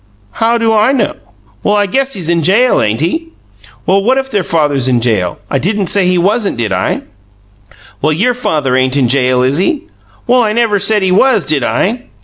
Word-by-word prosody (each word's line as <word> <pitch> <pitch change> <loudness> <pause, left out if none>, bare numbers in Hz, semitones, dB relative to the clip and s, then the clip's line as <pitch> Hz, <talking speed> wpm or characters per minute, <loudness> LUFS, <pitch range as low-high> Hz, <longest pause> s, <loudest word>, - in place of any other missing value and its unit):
"How 230 - 0
do 225 -1 +1
I 220 +5 +3
know?" 240 -7 0 0.5
"Well, 205 - +1
I 205 0 +2
guess 270 +7 -1
he's 180 -5 -4
in 170 0 +1
jail, 210 +10 +3
ain't 110 +4 -1
he?" 320 - -2 0.6
"Well, 195 +1 +2
what 255 +6 +1
if 265 0 -3
their 205 - +1
father 155 -4 0
is 135 -2 0
in 125 -2 +2
jail? 110 -7 -1
I 135 - -1
didn't 200 +2 -1
say 195 -3 +2
he 180 0 +2
wasn't, 205 +4 0
did 115 -3 -2
I?" 95 0 -1 1.0
"Well, 155 - +1
YOUR 220 +11 +1
father 150 - -1
ain't 130 +1 +1
in 130 -4 +1
jail, 125 -1 +2
is 130 +3 +1
he?" 275 - -1 0.4
"Well, 250 +1 +3
I 215 -2 0
never 225 -3 +1
said 205 +1 +2
he 185 - +1
was, 220 +1 +3
did 145 -4 0
I?" 220 - -1
190 Hz, 210 wpm, -12 LUFS, 140-225 Hz, 1.0 s, I